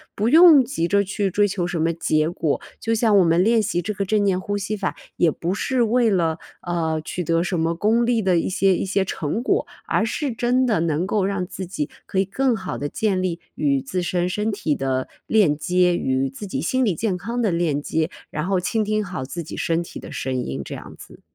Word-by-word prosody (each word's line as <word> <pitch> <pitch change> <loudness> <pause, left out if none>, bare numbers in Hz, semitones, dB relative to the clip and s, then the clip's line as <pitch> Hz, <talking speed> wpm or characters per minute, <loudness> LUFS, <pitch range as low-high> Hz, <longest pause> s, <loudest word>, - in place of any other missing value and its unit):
不 215 +3 +1
用 320 -1 +8
急 230 -9 -2
着 200 +3 +3
去 200 0 -1
追 205 +3 +2
求 190 -3 -1
什 175 - -3
么 165 +1 +2
结 155 -1 +1
果。 165 -3 -1 0.2
就 225 0 0
像 220 -2 +3
我 190 - +6
们 165 +2 +3
练 225 +2 +4
习 175 -4 -1
这 210 +5 -3
个 200 0 -2
正 210 +1 +1
念 190 -2 +2
呼 205 +2 -3
吸 205 +2 -3
法， 195 -2 -2 0.2
也 170 - +4
不 170 +4 -2
是 255 +5 0
为 235 +1 +3
了， 165 -5 +1 0.2
呃， 160 -3 -1
取 180 - -4
得 165 0 +1
什 175 -1 -1
么 165 +1 0
功 220 +6 +2
利 235 -1 +2
的 185 -3 +2
一 - - -1
些 190 0 +2
一 - - -2
些 195 0 +1
成 185 +4 -3
果， - - +1 0.2
而 - - +1
是 270 +4 -2
真 245 +3 +1
的 225 -7 +1
能 165 +1 0
够 200 0 0
让 195 -2 -1
自 190 +1 -6
己 150 -5 -3 0.2
可 - - -5
以 190 - +4
更 245 +6 0
好 190 -3 -5
地 145 - -3
建 195 +2 0
立 175 -2 -2
与 140 -2 +1
自 180 +8 -3
身 175 0 0
身 210 +4 -1
体 170 -7 -1
的 130 -2 -2 0.2
链 190 -10 +3
接， 180 +1 +2
与 130 +1 0
自 170 +10 -8
己 135 - -3
心 255 - +1
理 195 -6 +1
健 195 +1 -1
康 230 +6 -3
的 215 -5 +2
链 165 -4 0
接， 160 +2 -1 0.2
然 150 +3 -3
后 195 -1 +2
倾 215 +5 0
听 215 0 0
好 180 -9 -5
自 140 +6 -5
己 160 - -8
身 165 +1 0
体 - - -9
的 - - -9
声 130 - -3
音， 65 - -4
这 - - -7
样 - - -10
子。 - - -14
185 Hz, 260 characters per minute, -22 LUFS, 165-215 Hz, 0.2 s, 用